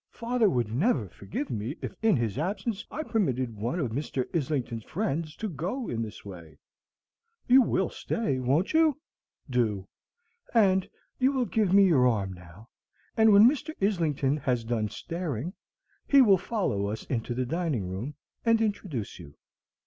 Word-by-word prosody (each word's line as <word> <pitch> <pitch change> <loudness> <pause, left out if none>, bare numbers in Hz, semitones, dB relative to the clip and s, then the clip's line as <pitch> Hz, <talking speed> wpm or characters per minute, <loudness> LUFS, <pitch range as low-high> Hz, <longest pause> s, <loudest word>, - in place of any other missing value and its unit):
"Father 235 -2 +1
would 120 -8 -1
never 130 - +1
forgive 100 - -6
me 115 +5 -3
if - - -5
in 220 -4 +4
his 115 -4 -1
absence 195 +5 -2
I 310 - -4
permitted 130 - -1
one 120 - -2
of 130 -8 -1
Mr. 130 0 -2
Islington's 130 -7 -2
friends 165 -5 -2
to 220 - -4
go 195 - -4
in 115 - -2
this 110 -2 -7
way. 85 -5 -11 0.9
You 260 +2 +7
will 190 -5 0
stay, 145 - -2
won't 140 - +1
you? 315 -3 +4 0.5
Do! 110 -7 0 0.7
And 190 -4 +4 0.3
you 260 +1 +4
will 260 -3 0
give 215 -5 +1
me 200 +1 +7
your 140 -9 +4
arm 100 -5 0
now; 90 +5 -14 0.5
and 220 -1 +5
when 205 +3 +8
Mr. 300 +4 -1
Islington 155 -8 +1
has 125 -4 -1
done 115 -2 -1
staring, 165 - -4 0.5
he 280 - +6
will 200 -8 +6
follow 180 - -1
us 105 +2 -4
into 120 -1 -3
the 130 +1 -1
dining 150 - -1
room 105 +11 -5 0.3
and 230 -1 +4
introduce 195 - -3
you." 70 -4 -12
150 Hz, 160 wpm, -28 LUFS, -, 0.9 s, when